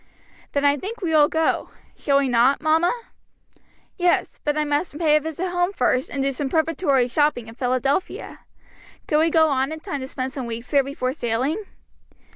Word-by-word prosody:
"Then 285 Hz, 0 st, +1 dB
I 285 Hz, 0 st, +4 dB
think 420 Hz, -, -6 dB
we 335 Hz, -, 0 dB
will 300 Hz, -2 st, +5 dB
go. 320 Hz, +1 st, 0 dB, 0.3 s
Shall 280 Hz, -2 st, +1 dB
we 280 Hz, -1 st, +2 dB
not, 245 Hz, +3 st, +3 dB
mamma?" 320 Hz, +3 st, +2 dB, 1.1 s
"Yes; 355 Hz, -1 st, +1 dB
but 295 Hz, 0 st, 0 dB
I 305 Hz, -, +2 dB
must 295 Hz, +1 st, -1 dB
pay 310 Hz, -2 st, +3 dB
a -, -, +5 dB
visit 320 Hz, +4 st, -4 dB
home 355 Hz, +1 st, 0 dB
first, 255 Hz, -4 st, +1 dB
and 275 Hz, -1 st, -2 dB
do 275 Hz, -, +1 dB
some 270 Hz, +1 st, -3 dB
preparatory 310 Hz, -4 st, +1 dB
shopping 270 Hz, -3 st, +1 dB
in 225 Hz, -, -10 dB
Philadelphia. 255 Hz, +6 st, -2 dB, 0.7 s
Can 300 Hz, -, +2 dB
we 325 Hz, +1 st, +3 dB
go 320 Hz, -1 st, +4 dB
on 270 Hz, +1 st, 0 dB
in 315 Hz, -, -5 dB
time 315 Hz, -4 st, -5 dB
to 260 Hz, -, -5 dB
spend 260 Hz, 0 st, -4 dB
some 265 Hz, -4 st, -5 dB
weeks 230 Hz, +1 st, -6 dB
there 280 Hz, -2 st, +4 dB
before 260 Hz, -2 st, -3 dB
sailing?" 270 Hz, -, -2 dB
290 Hz, 190 wpm, -23 LUFS, 260-320 Hz, 1.1 s, will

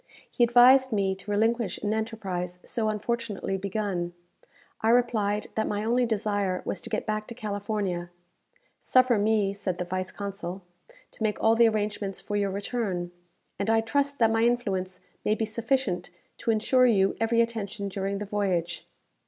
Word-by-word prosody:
He 245 Hz, -, +2 dB
advised 250 Hz, +2 st, +6 dB
me 195 Hz, -3 st, +1 dB
to 190 Hz, +2 st, -11 dB
relinquish 220 Hz, 0 st, +1 dB
an 210 Hz, 0 st, +1 dB
enterprise 195 Hz, -5 st, -3 dB
so 220 Hz, -2 st, 0 dB
unfortunately 215 Hz, -2 st, -2 dB
begun. 195 Hz, -3 st, -2 dB, 0.7 s
I 220 Hz, -, +2 dB
replied 220 Hz, -4 st, +2 dB
that 220 Hz, -, 0 dB
my 205 Hz, 0 st, -2 dB
only 240 Hz, +2 st, +2 dB
desire 205 Hz, -4 st, -1 dB
was -, -, -3 dB
to -, -, -7 dB
get 220 Hz, -, -2 dB
back 215 Hz, -1 st, -2 dB
to 235 Hz, -, -8 dB
California. 205 Hz, -4 st, -3 dB, 0.7 s
"Suffer 255 Hz, -3 st, +4 dB
me," 205 Hz, -1 st, +2 dB
said 195 Hz, -3 st, -3 dB
the 180 Hz, -, -3 dB
vice 185 Hz, +1 st, -3 dB
consul, 195 Hz, -2 st, -6 dB, 0.5 s
"to -, -, -16 dB
make 215 Hz, -1 st, 0 dB
all 225 Hz, -, +4 dB
the 230 Hz, 0 st, +6 dB
arrangements 205 Hz, -2 st, -2 dB
for 205 Hz, -, -5 dB
your 200 Hz, -1 st, +1 dB
return; 195 Hz, -3 st, -3 dB, 0.5 s
and 200 Hz, +2 st, -1 dB
I 225 Hz, 0 st, +4 dB
trust 280 Hz, +5 st, 0 dB
that 225 Hz, -3 st, +4 dB
my 225 Hz, 0 st, +2 dB
influence 195 Hz, -6 st, 0 dB, 0.2 s
may 210 Hz, -, +2 dB
be 220 Hz, -, -1 dB
sufficient 220 Hz, -4 st, -1 dB, 0.3 s
to -, -, -3 dB
ensure 250 Hz, +3 st, +4 dB
you 195 Hz, -4 st, +3 dB
every 225 Hz, +1 st, +2 dB
attention 220 Hz, -3 st, -1 dB
during 195 Hz, 0 st, -2 dB
the 210 Hz, -, -4 dB
voyage." 185 Hz, -4 st, -1 dB
210 Hz, 165 wpm, -27 LUFS, 195-230 Hz, 0.7 s, advised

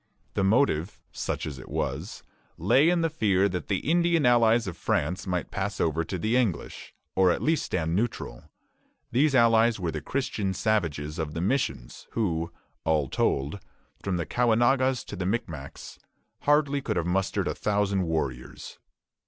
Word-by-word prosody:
The 100 Hz, -, 0 dB
motive, 95 Hz, -, +2 dB
such -, -, -3 dB
as 70 Hz, -3 st, -6 dB
it -, -, -11 dB
was, -, -, -3 dB, 0.3 s
lay 145 Hz, +5 st, +4 dB
in 175 Hz, -1 st, +2 dB
the 165 Hz, -, +1 dB
fear 100 Hz, -, +2 dB
that 90 Hz, -4 st, -4 dB
the 100 Hz, +4 st, -2 dB
Indian 170 Hz, -2 st, +3 dB
allies 120 Hz, -1 st, +4 dB
of 95 Hz, -4 st, -5 dB
France 85 Hz, +3 st, -1 dB
might 90 Hz, -1 st, -2 dB
pass 100 Hz, +1 st, -3 dB
over 80 Hz, +1 st, +1 dB
to 90 Hz, +3 st, -4 dB
the 110 Hz, +7 st, 0 dB
English, 115 Hz, -9 st, -2 dB, 0.2 s
or 95 Hz, -1 st, +5 dB
at -, -, +1 dB
least 160 Hz, 0 st, +1 dB
stand 85 Hz, -1 st, -1 dB
neutral. 100 Hz, -, -3 dB, 0.6 s
These 135 Hz, +4 st, +3 dB
allies 115 Hz, -2 st, +4 dB
were 85 Hz, -3 st, -1 dB
the 75 Hz, -, -4 dB
Christian 105 Hz, -, -2 dB
savages 85 Hz, -8 st, -1 dB
of 75 Hz, -1 st, -3 dB
the 80 Hz, -, -2 dB
missions, 85 Hz, -, -2 dB
who, 85 Hz, -7 st, -1 dB, 0.3 s
all 75 Hz, -4 st, +1 dB
told, 70 Hz, +8 st, 0 dB, 0.4 s
from 95 Hz, -2 st, -1 dB
the 85 Hz, -, -2 dB
Caughnawagas 125 Hz, -, +2 dB
to -, -, -7 dB
the 90 Hz, -1 st, -3 dB
Micmacs, 80 Hz, -, -5 dB
could -, -, -32 dB
hardly 145 Hz, -1 st, +3 dB
have 85 Hz, -9 st, -1 dB
mustered 95 Hz, +2 st, 0 dB
a -, -, 0 dB
thousand 100 Hz, -2 st, 0 dB
warriors. 70 Hz, -6 st, -4 dB
100 Hz, 160 wpm, -27 LUFS, 80-120 Hz, 0.6 s, or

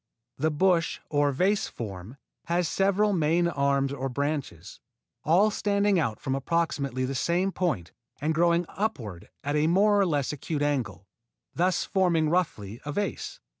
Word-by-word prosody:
The 155 Hz, +3 st, +2 dB
bush 165 Hz, +2 st, +1 dB
or 145 Hz, -1 st, +2 dB
vase 190 Hz, +9 st, +1 dB
form 105 Hz, +2 st, -8 dB, 0.3 s
has 170 Hz, 0 st, +1 dB
several 200 Hz, +4 st, +2 dB
main 170 Hz, 0 st, +2 dB
arms 140 Hz, -3 st, +1 dB
or 135 Hz, -1 st, -3 dB
branches, 140 Hz, -, -4 dB, 0.4 s
all 190 Hz, +7 st, +4 dB
standing 200 Hz, -2 st, +1 dB
out 115 Hz, -9 st, -1 dB
from 135 Hz, -2 st, -2 dB
approximately 140 Hz, -3 st, -1 dB
the 135 Hz, -, -3 dB
same 175 Hz, +8 st, 0 dB
point 140 Hz, -, -2 dB, 0.3 s
and 155 Hz, +2 st, 0 dB
growing 170 Hz, +2 st, +2 dB
upward 120 Hz, -, -4 dB
at 145 Hz, +1 st, -1 dB
a 150 Hz, +1 st, +2 dB
more 205 Hz, +4 st, +4 dB
or 195 Hz, -, +3 dB
less 145 Hz, -4 st, 0 dB
acute 150 Hz, +1 st, -3 dB
angle, 115 Hz, -, -2 dB, 0.5 s
thus 180 Hz, +1 st, +1 dB
forming 170 Hz, -5 st, +2 dB
roughly 115 Hz, -, -1 dB
a 150 Hz, -, -4 dB
vase. 205 Hz, +7 st, -3 dB
155 Hz, 150 wpm, -27 LUFS, 135-180 Hz, 0.5 s, all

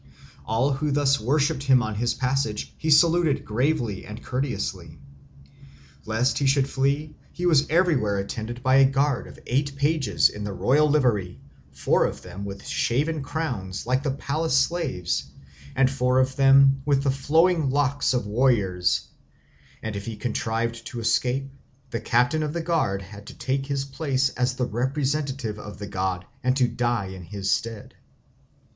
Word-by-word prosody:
All 115 Hz, +6 st, +1 dB
who 150 Hz, +3 st, -1 dB
thus 140 Hz, -1 st, +2 dB
worshipped 140 Hz, +4 st, +1 dB
him 130 Hz, -3 st, +4 dB
on 110 Hz, -1 st, -3 dB
his 120 Hz, +3 st, -1 dB
passage 130 Hz, -4 st, -1 dB
he 160 Hz, -, -3 dB
saluted 155 Hz, -2 st, +4 dB
gravely 120 Hz, -3 st, -1 dB
and 105 Hz, +3 st, -9 dB
courteously. 100 Hz, -, -3 dB, 1.1 s
Lest 115 Hz, +4 st, +1 dB
he 140 Hz, -, +1 dB
should 135 Hz, 0 st, +3 dB
flee, 140 Hz, +3 st, -1 dB, 0.2 s
he 175 Hz, -, -4 dB
was 155 Hz, -5 st, +4 dB
everywhere 150 Hz, -, +2 dB
attended 115 Hz, +5 st, -5 dB
by 130 Hz, 0 st, +4 dB
a 135 Hz, -1 st, +6 dB
guard 135 Hz, -1 st, 0 dB
of -, -, -13 dB
eight 140 Hz, +2 st, -1 dB
pages 140 Hz, -5 st, +2 dB
in 105 Hz, -, -7 dB
the 105 Hz, -1 st, -4 dB
royal 145 Hz, +10 st, +3 dB
livery, 115 Hz, -11 st, +1 dB, 0.3 s
four -, -, +2 dB
of -, -, -5 dB
them 90 Hz, +3 st, -8 dB
with 100 Hz, 0 st, -8 dB
shaven 150 Hz, +6 st, 0 dB
crowns 125 Hz, -, -4 dB
like 130 Hz, +2 st, +1 dB
the 145 Hz, -, -2 dB
palace 140 Hz, +2 st, -1 dB
slaves, 135 Hz, -, 0 dB, 0.5 s
and 135 Hz, -1 st, +3 dB
four 125 Hz, -1 st, +1 dB
of 130 Hz, 0 st, +2 dB
them 135 Hz, 0 st, +5 dB
with 140 Hz, -1 st, +1 dB
the 140 Hz, -, +2 dB
flowing 160 Hz, +3 st, +2 dB
locks 140 Hz, +1 st, +1 dB
of 120 Hz, -, -1 dB
warriors; 105 Hz, -6 st, +1 dB, 0.8 s
and 110 Hz, -2 st, -4 dB
if 100 Hz, +2 st, -6 dB
he 115 Hz, -, -4 dB
contrived 115 Hz, +1 st, -2 dB
to 120 Hz, -, -6 dB
escape, 125 Hz, +3 st, 0 dB, 0.4 s
the 115 Hz, -, -3 dB
captain 125 Hz, +7 st, +2 dB
of 150 Hz, -1 st, -2 dB
the 170 Hz, -1 st, -3 dB
guard 150 Hz, -, 0 dB
had 100 Hz, +1 st, -12 dB
to -, -, -10 dB
take 135 Hz, +1 st, -2 dB
his 140 Hz, -1 st, -2 dB
place 135 Hz, -1 st, 0 dB
as 125 Hz, 0 st, -1 dB
the 125 Hz, -1 st, -1 dB
representative 130 Hz, -1 st, -2 dB
of 105 Hz, 0 st, -9 dB
the 100 Hz, -, -6 dB
god 95 Hz, -2 st, -3 dB, 0.2 s
and 130 Hz, +1 st, +2 dB
to 125 Hz, -2 st, +3 dB
die 120 Hz, -3 st, -1 dB
in 95 Hz, -1 st, -8 dB
his 100 Hz, +3 st, -3 dB
stead. 115 Hz, -2 st, -3 dB
130 Hz, 165 wpm, -25 LUFS, 110-140 Hz, 1.1 s, a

